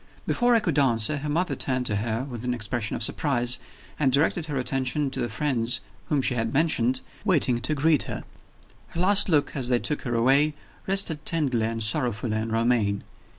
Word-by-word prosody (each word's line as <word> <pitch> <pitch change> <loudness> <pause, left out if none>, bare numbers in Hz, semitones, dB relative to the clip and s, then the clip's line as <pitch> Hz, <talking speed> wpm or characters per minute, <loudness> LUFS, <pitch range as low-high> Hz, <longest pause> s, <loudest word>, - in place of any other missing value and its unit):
Before 245 0 +2
I - - +5
could 170 -9 0
answer, 130 +1 +3
her 150 +1 -5
mother 175 +5 0
turned 130 -2 0
to 105 -3 0
her 110 +3 -2
with 120 -3 -7
an 125 0 -1
expression 110 -1 -2
of - - 0
surprise, 125 -1 +1 0.4
and 140 -3 +2
directed 155 +4 +2
her 145 -3 -3
attention 135 +2 0
to - - 0
the 120 - -2
friends 120 -1 -1 0.3
whom 145 -3 +1
she 130 - +2
had 115 -2 -2
mentioned, 130 -4 +1 0.2
waiting 145 - +2
to 150 +5 0
greet 150 0 +3
her. - - -5 0.6
Her 170 - -7
last 195 +2 +4
look, 150 -3 +1
as 130 -3 -2
they 125 - +3
took 150 +4 -2
her 120 -3 -3
away, 140 +6 +3 0.3
rested 190 -6 +1
tenderly 130 -9 0
and 115 -1 -3
sorrowfully 115 -2 0
on 110 +1 -3
Romayne. 115 -3 +1
130 Hz, 195 wpm, -25 LUFS, 115-150 Hz, 0.6 s, I